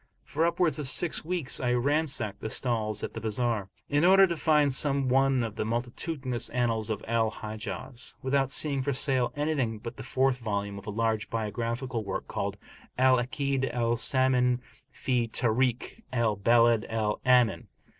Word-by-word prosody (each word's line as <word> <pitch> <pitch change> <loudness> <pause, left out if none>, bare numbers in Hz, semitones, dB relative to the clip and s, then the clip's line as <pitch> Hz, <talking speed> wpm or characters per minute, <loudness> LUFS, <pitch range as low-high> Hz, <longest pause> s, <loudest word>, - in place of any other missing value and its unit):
For 160 +3 0
upwards 170 -2 +1
of 145 - -3
six 165 +4 +2
weeks, 170 -4 -2
I 125 -1 0
ransacked 135 -4 0
the 110 - -4
stalls 110 -4 -1
and - - -4
the 115 - -6
bazar, 110 -2 -1 0.2
in 145 +2 +1
order 195 +2 +7
to 170 -2 -2
find 150 -3 +3
some 140 -1 +2
one 135 -1 +3
of 110 -1 -5
the - - 0
multitudinous 125 +3 -3
annals 115 -3 -1
of 105 -2 -4
Al 115 -1 +1
Hijaz, 110 +4 -5
without 135 0 +1
seeing 140 -1 +2
for 140 +1 -1
sale 130 -2 +1
anything 145 -7 -1
but 115 +3 -8
the - - -7
fourth 130 0 +1
volume 100 -3 -3
of 100 - -15
a - - -2
large 110 0 -1
biographical 115 +2 -3
work 100 -2 -4
called - - -3 0.4
al 130 0 +5
Akd 135 +2 -1
al 120 -1 0
Samin 125 0 +2 0.3
fi 125 -3 -1
Tarikh 120 - 0
al 115 -4 +1
Balad 115 +2 +3
al 110 -2 -1
Amin. 125 -2 +3
125 Hz, 165 wpm, -28 LUFS, 115-135 Hz, 0.4 s, order